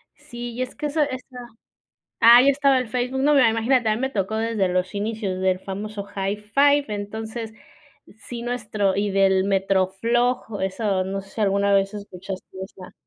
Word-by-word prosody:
Sí, 240 -5 -8
y 245 - -5
es 255 - -4
que 300 0 -3
eso 300 +2 -1
esa. 260 -2 -4 0.8
Ah, 235 +1 +9
ya 275 - +4
estaba 275 -1 +3
el 255 - -3
Facebook, 250 +3 -2
no, 295 +2 +4
mira, 255 -5 +6
imagínate, 225 +1 +1
a 215 - +2
mi 230 - -5
me 265 - 0
tocó 205 -3 -2
desde 220 -3 0
los 180 +2 -1
inicios 205 -2 -3
del 185 -1 +1
famoso, 200 +2 -6
Hi5, 210 +9 +2
entonces, 220 +2 -5 0.7
sí 240 -1 -6
nuestro 215 -5 -1
y 200 0 0
del 190 -1 +3
MetroFLOG, 200 +4 0
eso, 190 0 -1
no 195 +1 -4
sé, 195 - -17
si 220 - -5
alguna 200 0 +2
vez 195 +1 +1
escuchaste 190 -2 -8 0.2
esa 190 -1 -12
215 Hz, 175 wpm, -23 LUFS, 195-245 Hz, 0.8 s, Ah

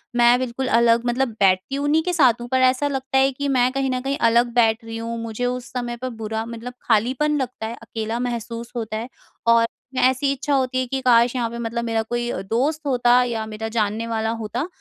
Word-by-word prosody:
मैं 240 0 +5
बिल्कुल 255 +1 -3
अलग 235 0 +3
मतलब 250 +2 +1
बैठती 190 +6 +2
हूँ 285 +1 -2
उन्हीं 305 +2 +3
के 360 +1 -1
साथ 255 -8 +4
हूँ 240 - -6
पर 260 - +3
ऐसा 255 +2 +3
लगता 270 -1 -2
है 270 +1 +4
कि 285 +2 -4
मैं 255 -2 +3
कहीं 270 0 -1
न 255 - -1
कहीं 275 +2 -2
अलग 235 +1 +3
बैठ 225 -2 +3
रही 225 0 -6
हूँ 230 +1 -4
मुझे 230 +2 -3
उस 250 0 -3
समय 240 -1 -3
पर 255 +2 -4
बुरा 220 +1 -3
मतलब 235 +1 -7
खालीपन 255 +7 +1
लगता 250 -3 -5
है। 230 - -5
अकेला 225 0 -4
महसूस 235 -1 -4
होता 220 -2 -3
है 230 +3 -5 0.4
और 230 0 +5 0.4
ऐसी 260 +2 +3
इच्छा 275 +2 -2
होती 260 -1 +1
है 255 - 0
कि 270 +2 -2
काश 240 -1 +4
यहाँ 240 -2 0
पे 235 - -7
मतलब 235 0 -3
मेरा 225 -1 0
अ, - - 0
कोई 240 0 -1 0.2
दोस्त 285 +7 0
होता 245 -2 +4
या 230 -3 -2
मेरा 220 0 -5
जानने 220 0 -1
वाला 220 -1 -1
होता। 240 +8 -3
240 Hz, 225 wpm, -22 LUFS, 230-260 Hz, 0.4 s, मैं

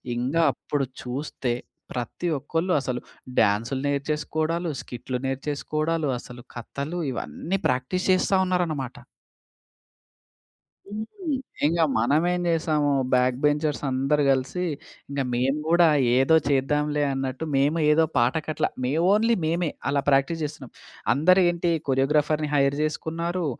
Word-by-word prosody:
ఇంగ 125 +5 -2 0.2
అప్పుడు 140 +1 -2 0.2
చూస్తే 130 -1 -3 0.4
ప్రతి 125 +8 -4
ఒక్కళ్ళు 165 +6 -1
అసలు 125 -2 -3 0.4
డాన్స్‌లు 110 +6 +2
నేర్చేసుకోడాలు, 155 +4 -1
స్కిట్‌లు 125 +1 -5
నేర్చేసుకోడాలు, 150 +4 -2
అసలు 125 0 -11
కథలు 140 +8 -5
ఇవన్నీ 170 +8 -3
ప్రాక్టీస్ 130 +9 -1
చేస్తా 185 +1 +3
ఉన్నారనమాట. 160 -8 -1 1.9
హ్మ్. 210 +2 -5 0.6
ఇంక 165 +2 +2 0.2
మనమేం 155 +10 +2
జేసాము 155 -3 +1 0.2
బ్యాక్ 125 0 +3
బెంచర్స్ 150 0 +1
అందరూ 135 +3 +1
కలిసి 135 +6 0 0.5
ఇంక 140 0 -3
మేము 130 +4 +1
కూడా 170 0 +6 0.3
ఏదో 135 +5 +5
చేద్దాంలే 150 +2 +1
అన్నట్టు 135 +2 -3
మేము 145 +4 +2
ఏదో 160 +2 +4
పాట 120 +3 +3
కట్ల, 155 0 -1 0.2
మే 125 - 0 0.2
ఓన్లీ 225 +3 +3
మేమే 165 +1 0 0.2
అలా 140 0 +1
ప్రాక్టీస్ 140 +4 +2
జేస్తున్నాం. 145 -4 -6 0.4
అందరూ 180 +6 +4
ఏంటి 175 0 0 0.2
కొరియోగ్రాఫర్‌ని 150 +3 +2
హైర్ 140 0 +3
చేసుకున్నారు 165 +3 -2
150 Hz, 115 wpm, -25 LUFS, 135-165 Hz, 1.9 s, కూడా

